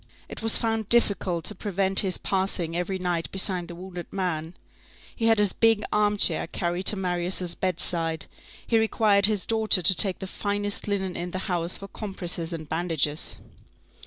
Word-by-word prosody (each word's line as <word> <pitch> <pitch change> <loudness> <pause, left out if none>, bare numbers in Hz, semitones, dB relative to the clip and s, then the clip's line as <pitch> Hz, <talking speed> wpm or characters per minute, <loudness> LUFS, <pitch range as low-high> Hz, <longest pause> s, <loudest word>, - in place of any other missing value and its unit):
It - - -9
was 225 0 +3
found 225 -2 -2
difficult 195 -7 +1
to - - 0
prevent 195 -1 +1
his 190 -3 +1
passing 185 -4 -2
every 180 +2 -2
night 175 -2 -3
beside 185 -2 -1
the 170 - -9
wounded 180 0 -9
man; 175 -3 -3 0.6
he 225 - 0
had 225 0 +4
his 205 -2 +3
big 225 -2 +2
armchair 205 -6 +2
carried 175 +2 -3
to - - +6
Marius' 180 -1 -1
bedside; 165 -3 0 0.4
he 230 - +2
required 210 -2 +3
his 210 -3 -1
daughter 220 -5 +4
to 190 - +7
take 190 0 +4
the - - -7
finest 205 +2 -3
linen 190 -3 -2
in 175 +1 -4
the 185 - -5
house 175 -2 -1
for 195 - -9
compresses 180 -5 -3
and 160 -2 -6
bandages. 160 -2 0
190 Hz, 165 wpm, -25 LUFS, 175-205 Hz, 0.6 s, to